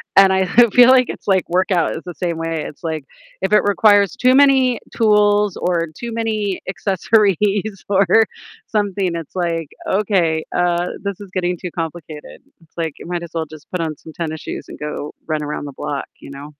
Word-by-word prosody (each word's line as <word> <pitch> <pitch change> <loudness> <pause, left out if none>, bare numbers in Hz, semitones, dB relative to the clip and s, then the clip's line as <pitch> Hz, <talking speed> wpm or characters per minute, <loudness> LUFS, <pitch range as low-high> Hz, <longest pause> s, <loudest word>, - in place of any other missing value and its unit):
And 195 -1 +7
I 190 0 +2 0.2
I 240 -1 +8
feel 245 +2 +7
like, 255 -1 +4
it's, - - -8
like 190 -3 +2
workout 180 -1 +1
is 160 - -7
the 175 - -6
same 170 -2 -2
way, 165 -1 -3
it's, 150 - -13
like 160 -3 -3 0.4
if 190 +2 0
it 210 - +5
requires 205 -1 +4
too 255 +1 +3
many 265 -3 +4 0.2
tools, 210 -3 +3
or 170 -2 0
too 235 +6 -6
many 215 -4 -1
accessories 195 0 +2 0.5
or 200 0 +4 0.6
something, 200 -4 -1
it's 165 +1 -7
like, 165 -3 -1 0.2
"Okay, 185 -6 +1
uh, 175 0 +1 0.2
this 200 -2 -4
is 200 -2 -11
getting 180 -1 -1
too 180 +1 -6
complicated." 160 -2 -7 0.2
It's 165 +1 -26
like, 165 -3 -2
you - - -10
might 175 -1 -3
as 170 - -9
well 165 -1 -2
just 155 0 -14
put 180 - -2
on 155 -2 -3
some 160 - -13
tennis 160 -2 -4
shoes - - -6
and - - -9
go 150 0 -5 0.2
run 155 -1 -1
around 150 0 -4
the 140 - -8
block, 140 +1 -4
you - - -12
know? 140 +2 -10
180 Hz, 200 wpm, -19 LUFS, 165-205 Hz, 0.6 s, I